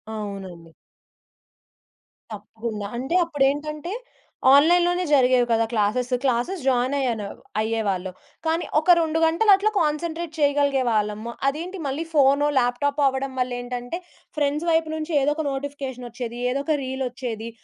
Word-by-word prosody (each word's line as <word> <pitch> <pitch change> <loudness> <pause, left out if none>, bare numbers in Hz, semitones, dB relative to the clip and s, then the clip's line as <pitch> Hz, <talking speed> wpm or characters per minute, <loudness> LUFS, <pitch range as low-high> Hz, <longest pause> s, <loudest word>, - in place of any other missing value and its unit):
అవునండి. 190 -6 -7 1.6
తప్పకుండా. 215 0 -6
అంటే 265 +7 -2
అప్పుడేంటంటే 300 +2 -1 0.6
ఆన్‌లైన్‌లోనే 350 +4 +4
జరిగేవి 255 -3 +4
కదా! 225 0 +3
క్లాసెస్ 235 +4 0
క్లాసెస్ 265 +8 0
జాయిన్ 255 +1 +2
అయ్యాను. 230 -6 -1 0.3
అయ్యేవాళ్ళు 200 -5 -1 0.3
కానీ 325 +2 0
ఒక 345 +3 +4
2 320 0 0
గంటలు 335 +7 +3
అట్లా 420 +3 0
కాన్సంట్రేట్ 325 +2 -2
చేయగలిగేవాళ్ళము. 245 -7 +1 0.2
అదేంటి 345 +6 -6
మళ్ళీ 285 +5 -2
ఫోనో 285 0 +4
ల్యాప్‌టాపో 280 +4 0
అవ్వడం 265 0 -2
వల్ల 250 0 0
ఏంటంటే 245 +6 -5 0.4
ఫ్రెండ్స్ 295 +3 0
వైపు 320 -1 +2
నుంచి 315 +1 -4
ఏదో 290 +2 +2
ఒక 315 - -3
నోటిఫికేషన్ 270 -2 -5
ఓచ్చేది. 240 0 -6
ఏదో 275 +2 -1
ఒక 315 - +2
రీల్ 265 0 -3
ఓచ్చేది. 230 -3 -5
270 Hz, 125 wpm, -23 LUFS, 235-310 Hz, 1.6 s, ఆన్‌లైన్‌లోనే